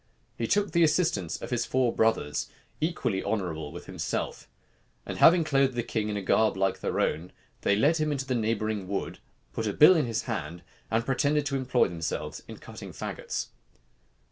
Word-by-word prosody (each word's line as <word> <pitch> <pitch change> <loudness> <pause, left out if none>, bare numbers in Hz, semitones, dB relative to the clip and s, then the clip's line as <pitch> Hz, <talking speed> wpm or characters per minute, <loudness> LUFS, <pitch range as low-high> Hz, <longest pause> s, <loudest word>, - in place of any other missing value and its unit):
He 115 - -2
took 205 - +1
the 170 - +2
assistance 155 - +1
of - - -6
his 120 -1 0
four 125 -2 +1
brothers, 110 -10 +1 0.3
equally 150 - -1
honorable 80 -8 -2
with 85 - -9
himself: - - -4 0.6
and - - -5
having 170 0 +7
clothed 135 -4 +2
the 120 - -1
king 110 -2 -2
in 105 - -2
a 100 - -4
garb 110 +1 +2
like 95 0 0
their - - -2
own, 85 +4 -1 0.3
they 100 - +3
led 145 +10 +3
him 155 -1 0
into 135 -2 -2
the 130 - -1
neighboring 110 -3 -1
wood, 100 +1 -3 0.3
put 110 - -2
a 105 - -1
bill 155 - +8
in 150 -6 +1
his 115 -1 -2
hand, 85 - -5 0.3
and 115 +1 0
pretended 145 +2 +1
to 140 - -1
employ 130 -2 +2
themselves 80 -2 -4
in - - -9
cutting - - -10
fagots. 60 +1 -5
115 Hz, 185 wpm, -28 LUFS, 95-140 Hz, 0.6 s, bill